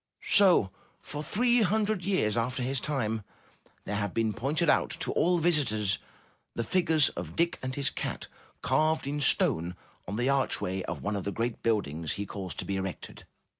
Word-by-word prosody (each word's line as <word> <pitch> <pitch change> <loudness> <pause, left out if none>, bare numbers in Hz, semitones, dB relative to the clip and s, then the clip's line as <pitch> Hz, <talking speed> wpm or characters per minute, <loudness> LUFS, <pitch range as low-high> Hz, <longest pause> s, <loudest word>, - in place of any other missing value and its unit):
So 180 - +6 0.3
for 145 - -6
three 240 +8 +2
hundred 210 -1 +1
years 170 - +1
after 125 +2 -1
his 130 +1 0
time, 115 -6 -1 0.6
there 105 - -2
have 100 -2 -3
been 110 -1 +1
pointed 140 - -1
out - - +3
to - - 0
all 180 +1 +2
visitors 135 - +2 0.6
the 115 - -1
figures 160 +1 +3
of 85 -2 -7
Dick 170 0 +1
and 130 0 -4
his 140 -3 -1
cat - - -4 0.4
carved 155 +5 +2
in 145 +1 -3
stone 85 - +2 0.3
on 100 - -4
the 120 +3 0
archway 130 -8 +1
of - - -5
one 105 +1 -1
of 100 - -3
the 100 - -2
great 115 +2 -3
buildings 85 -9 -1
he 100 - -4
caused 95 -3 -6
to - - -3
be 100 - -2
erected. 95 -1 -6
125 Hz, 175 wpm, -29 LUFS, 100-155 Hz, 0.6 s, So